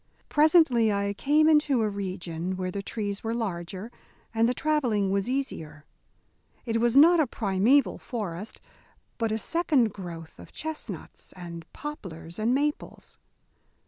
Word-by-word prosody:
Presently 295 -8 +5
I 200 0 0
came 300 +8 +3
into 295 -6 +4
a - - +2
region 185 -3 -4
where 185 -1 -2
the 200 - -4
trees 205 -1 -4
were 225 +1 -1
larger 195 -1 -4 0.4
and 225 +1 +3
the - - +1
travelling 245 -11 +1
was 195 +3 0
easier. 160 - -4 0.8
It 230 -1 0
was 240 +2 +3
not 335 +4 +8
a 305 - +3
primeval 220 +6 +2
forest, 205 -4 -5 0.6
but 225 -2 0
a 220 - 0
second 275 - +1
growth 170 -4 -9
of - - -12
chestnuts 315 0 -6
and 170 -2 -9
poplars 185 - -8
and 220 +3 +1
maples. 290 +3 -2
220 Hz, 140 wpm, -27 LUFS, 190-275 Hz, 0.8 s, not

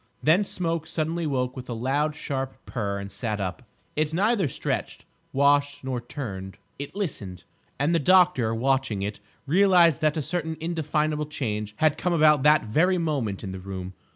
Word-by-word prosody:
Then 165 +7 +5
Smoke 165 -4 -2
suddenly 165 +1 -2
woke 125 -3 -1
with 125 -1 -8
a 120 - -3
loud 145 +6 0
sharp 135 -3 -4
purr 100 -5 -3
and 100 0 -6
sat 105 +1 -3
up. 95 +5 -3 0.3
It 155 +1 0
neither 205 -1 +2
stretched, 130 - -3 0.3
washed 145 +1 +2
nor 130 -2 -3
turned: 95 -7 -6 0.2
it 145 +5 -6
listened. 105 - -4 0.3
And 145 +5 +1
the 170 - +3
doctor, 180 -8 +4
watching 130 -4 0
it, 105 +1 -4 0.3
realised 175 -1 +5
that 155 +1 +2
a 155 - -1
certain 160 +1 -3
indefinable 155 -2 -1
change 105 -7 -3
had 155 -2 +2
come 180 - 0
about 150 -3 +5
that 150 +2 +5
very 170 - +2
moment 140 - -2
in 95 - -4
the 95 - -6
room. 95 0 -6
145 Hz, 170 wpm, -26 LUFS, 115-160 Hz, 0.3 s, Then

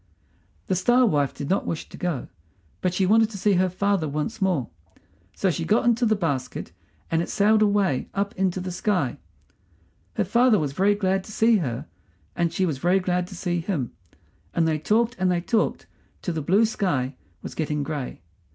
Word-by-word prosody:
The 190 - 0
Star 240 +8 +4
wife 145 - +2
did 140 - -6
not 190 +5 0
wish 165 - -3
to - - -11
go, 175 -7 -3 0.5
but 180 - +1
she 185 +2 +1
wanted 220 +3 +4
to 210 - -7
see 205 +2 +2
her 185 0 +3
father 185 -3 0
once 155 +10 -3
more, 180 -10 +1 0.7
so 190 - +1
she 165 - -3
got 215 +8 +2
into 235 0 +3
the 215 - +3
basket 140 - -3 0.4
and 165 0 +2
it - - -4
sailed 215 +1 +3
away 200 -9 +2
up 200 +2 -1
into 190 -1 0
the 185 0 -4
sky. 180 - -1 1.0
Her - - +1
father 235 +3 +4
was 145 -6 -1
very 200 +6 +3
glad 190 -1 0
to - - -10
see 225 +1 +4
her, 125 - -3 0.5
and 170 -1 +1
she 185 +3 0
was 150 -7 -2
very 180 +4 +3
glad 180 -1 -1
to 185 - -10
see 175 0 -1
him, 165 - -2 0.6
and 165 -1 +3
they 155 -1 +1
talked 230 +8 +1
and 185 0 +2
they 175 -1 +2
talked 220 +5 0 0.4
till 175 - -2
the 160 - -2
blue 195 +9 +4
sky 160 - -1 0.3
was - - -6
getting 150 -2 -2
gray. 140 - -5
185 Hz, 195 wpm, -24 LUFS, 160-205 Hz, 1.0 s, Star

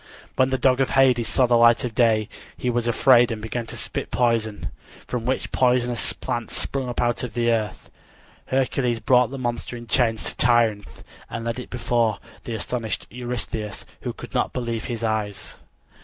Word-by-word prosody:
When 130 0 +3
the 130 - +1
dog 130 0 +3
of 135 - +2
Hades 125 -3 +4
saw 130 - +3
the 120 -1 +3
light 115 0 +6
of 120 -3 -3
day 110 -2 +3 0.3
he 125 - -1
was 120 0 0
afraid 120 0 +5
and 110 - -3
began 110 +2 -4
to - - -7
spit - - -3
poison, 115 -3 0 0.3
from 120 -1 -4
which 130 - -1
poisonous 125 -2 +2
plants 120 -2 -4
sprung 135 -2 -2
up 120 - -4
out 120 -1 +1
of 125 -2 -5
the 120 -1 +2
earth. 110 -4 -2 0.6
Hercules 130 -2 0
brought 125 +2 +4
the 135 - -6
monster 120 -1 -3
in 120 - -9
chains 115 -2 +1
to - - -4
Tirynth, 115 -4 +2 0.3
and 115 0 -5
led 115 +2 -2
it 125 - -8
before 120 -3 +1 0.3
the 115 - -3
astonished 110 0 -3
Eurystheus, 115 -3 -4 0.2
who - - -3
could - - -11
not - - 0
believe 120 -3 -3
his 115 -2 -4
eyes. 105 -3 -2
120 Hz, 185 wpm, -23 LUFS, 115-125 Hz, 0.6 s, light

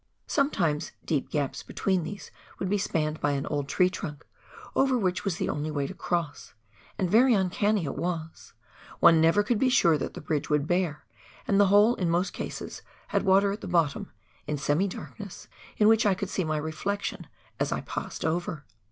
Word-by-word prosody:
Sometimes 175 - 0
deep 145 -4 -1
gaps 145 -3 -2
between 190 -3 -1
these 205 +4 -7 0.3
would 190 - -3
be 205 - +2
spanned 155 -5 -1
by 145 0 +1
an 140 -1 -2
old 145 -2 -2
tree 180 - +3
trunk, 165 -6 -6 0.5
over 265 -1 +3
which 185 -5 0
was 195 -5 -1
the - - -1
only 150 +1 -2
way 145 -2 -1
to 185 - -5
cross 170 -6 -3 0.2
— - - -28
and 185 - 0
very 235 +6 +5
uncanny 200 0 +1
it - - -4
was; 165 0 -4 0.5
one 165 -1 +7
never 165 +5 +4
could 210 +1 0
be 260 - +3
sure 170 - +4
that - - -4
the - - -6
bridge 150 -1 -2
would 150 -1 +2
bear, 175 -3 -1 0.4
and 200 - +3
the 205 - +6
hole 205 +4 +6
in 180 -7 -1
most 175 +3 0
cases - - -6 0.3
had - - +1
water 195 +1 +4
at 205 - -5
the - - -6
bottom, 165 -5 +1 0.4
in 150 0 -1
semi 145 +7 +1
darkness, 200 +1 -9 0.3
in 210 - +5
which 225 0 +5
I 195 - +3
could 190 0 -4
see 185 - 0
my 155 -1 -1
reflection 160 +7 -3 0.3
as - - 0
I - - -1
passed - - -5
over. 160 -2 -2
175 Hz, 195 wpm, -27 LUFS, 155-200 Hz, 0.5 s, one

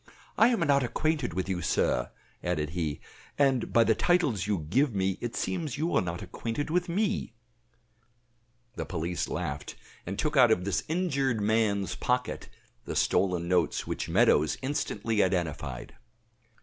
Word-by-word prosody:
"I 225 - +6
am 235 -5 +1
not 140 -3 +3
acquainted 140 - -1
with 95 0 -1
you, 95 -2 -2
sir," - - +1 0.3
added 75 0 -1
he; 80 -5 -3 0.4
"and 135 -4 +2
by 115 - +5
the 110 0 +3
titles 140 - +1
you 95 -7 -1
give 130 - +2
me 95 -1 0
it 120 -1 -4
seems 160 -9 -2
you 165 +4 -1
are - - +4
not 85 0 -4
acquainted 115 +10 -4
with 180 +1 +1
me." 205 - -1 1.4
The - - -3
police 85 0 -2
laughed, 75 -5 -4 0.3
and 95 +2 -4
took 155 0 -1
out 125 -4 +7
of 90 -5 +2
this 100 -5 0
injured 140 -8 0
man's 105 -2 +1
pocket 125 0 -2 0.4
the - - -4
stolen 90 -3 +1
notes 90 -1 +1
which - - -4
Meadows 75 +1 +3
instantly 115 -6 -1
identified. 80 -8 -2
110 Hz, 150 wpm, -28 LUFS, 90-145 Hz, 1.4 s, out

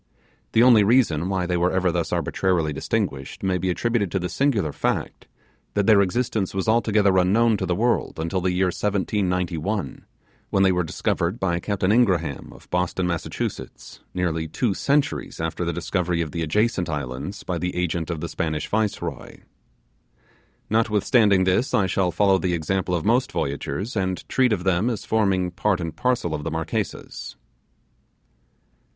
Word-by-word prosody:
The 115 - +5
only 120 -4 +7
reason 100 - +3
why 95 -2 0
they 90 0 0
were 90 +1 +2
ever 95 -1 +1
thus - - -2
arbitrarily 85 -5 0
distinguished 70 -1 -3
may 95 -1 +1
be 95 +2 -1
attributed 110 +1 0
to 95 - -1
the 90 -1 -2
singular 100 - +1
fact, - - -2 0.5
that 100 -1 +2
their 105 -2 +6
existence 100 -1 -1
was 95 +1 -1
altogether 110 -3 +3
unknown 110 +5 +3
to - - -3
the 90 - +1
world 120 +5 0
until 85 +3 -1
the 90 +1 +1
year 90 0 +1
1791, 95 -4 -1 0.4
when 95 - +2
they 95 - +5
were 90 -1 +1
discovered 85 +5 -1
by 85 -4 0
Captain 100 0 0
Ingraham, 90 - +1
of - - -16
Boston, 90 +1 0
Massachusetts, 85 -2 -5 0.2
nearly 80 -3 -1
two 105 +6 -1
centuries 140 - 0
after 80 +2 -2
the 85 - -1
discovery 85 +1 -1
of 80 -3 -3
the 85 - -3
adjacent 90 +2 0
islands 75 +5 -5
by 90 -2 -3
the 90 +1 -3
agent 85 -2 -1
of 85 -3 -3
the - - -3
Spanish 80 -2 -3
Viceroy. 110 -1 -3 1.3
Notwithstanding 105 -2 +3
this, 95 +8 +1
I 100 - +3
shall 95 0 +1
follow 95 +2 +3
the 90 -2 0
example 90 +2 -1
of 80 - -3
most 125 +4 +2
voyagers, 70 - -3
and 95 -2 -2
treat 130 -2 +2
of 95 -5 0
them 95 +4 +2
as 115 -4 -4
forming 95 -5 +1
part 95 +1 0
and 85 -3 -4
parcel 125 -10 0
of 75 - -3
Marquesas. 80 0 -4
95 Hz, 160 wpm, -23 LUFS, 85-105 Hz, 1.3 s, only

